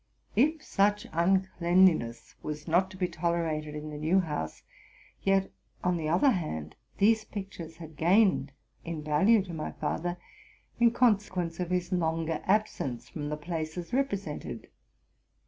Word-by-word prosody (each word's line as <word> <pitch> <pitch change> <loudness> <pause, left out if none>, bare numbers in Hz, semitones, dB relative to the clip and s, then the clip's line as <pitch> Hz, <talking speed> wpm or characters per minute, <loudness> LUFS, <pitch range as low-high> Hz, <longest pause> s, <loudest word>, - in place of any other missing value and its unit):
If 305 +8 +3
such 205 +1 +2
uncleanlhi 185 0 +4
ness 115 -3 -7
was 150 +1 -5
not 180 +3 +3
to 185 - -11
be 185 -1 +1
tolerated 160 -3 -1
in 150 0 -6
the 150 - -6
new 165 +5 +3
house, 150 - -3 0.6
yet, 195 0 +2 0.3
on 180 -1 +2
the 155 -2 -2
other 185 - +4
hand, 80 - -3 0.2
these 220 +2 +4
pictures 190 -6 -7
had 160 -3 -11
gained 180 -4 +3 0.3
in 165 -2 -5
value 190 +9 +4
to 180 -3 -8
my 155 -1 -4
father, 175 +2 -2 0.6
in 235 0 +6
consequence 205 -8 +1
of 180 -1 -2
his 180 0 -1
longer 165 -2 0
absence 190 - 0
from 145 -2 -5
the 150 - -2
places 165 +2 -4
repre 265 -5 +1 0.2
sented. - - -8
175 Hz, 145 wpm, -29 LUFS, 155-195 Hz, 0.6 s, in